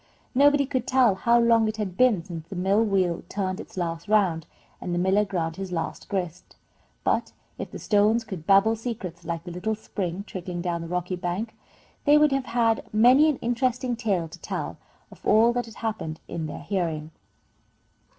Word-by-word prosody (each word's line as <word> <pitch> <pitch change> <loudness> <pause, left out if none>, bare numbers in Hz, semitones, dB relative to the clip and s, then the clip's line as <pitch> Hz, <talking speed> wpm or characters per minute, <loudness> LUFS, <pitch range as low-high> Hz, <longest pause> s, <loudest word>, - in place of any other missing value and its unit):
Nobody 285 +1 +5
could 255 -2 -2
tell 255 -5 +4
how 235 +5 +3
long 230 -1 +4
it 215 0 -3
had 200 -4 -3
been 225 -6 +3
since 165 -3 -8
the 195 - -8
mill 195 +4 +2
wheel 190 -5 +1
turned 190 -1 -2
its 225 - -10
last 165 -1 -3
round 190 -7 +2 0.3
and 175 -1 -3
the - - -1
miller 190 +3 +3
ground 165 -5 -3
his 190 -1 -5
last 165 -2 -4
grist, 180 -3 -4 0.5
but - - 0 0.3
if - - -5
the - - -8
stones 215 +2 +2
could 190 -7 -8
babble 200 +3 +5
secrets 205 -7 -6
like 165 0 -3
the 175 - -7
little 185 +5 -2
spring, 195 -3 -4
trickling 180 -3 -6
down 170 -1 -2
the 165 - -6
rocky 180 +1 -2
bank, 180 +5 -3 0.5
they 295 0 +7
would 300 -1 +5
have 270 -1 0
had 230 -2 +1
many 250 +8 +6
an 295 - 0
interesting 245 +1 0
tale 200 -8 -1
to 160 - -12
tell - - -4 0.3
of - - -16
all 225 +3 +5
that 245 -1 -2
had 225 - -12
happened 210 -8 -4
in 165 -2 -4
their 150 - -7
hearing. 165 -6 -2
200 Hz, 190 wpm, -25 LUFS, 175-230 Hz, 0.5 s, they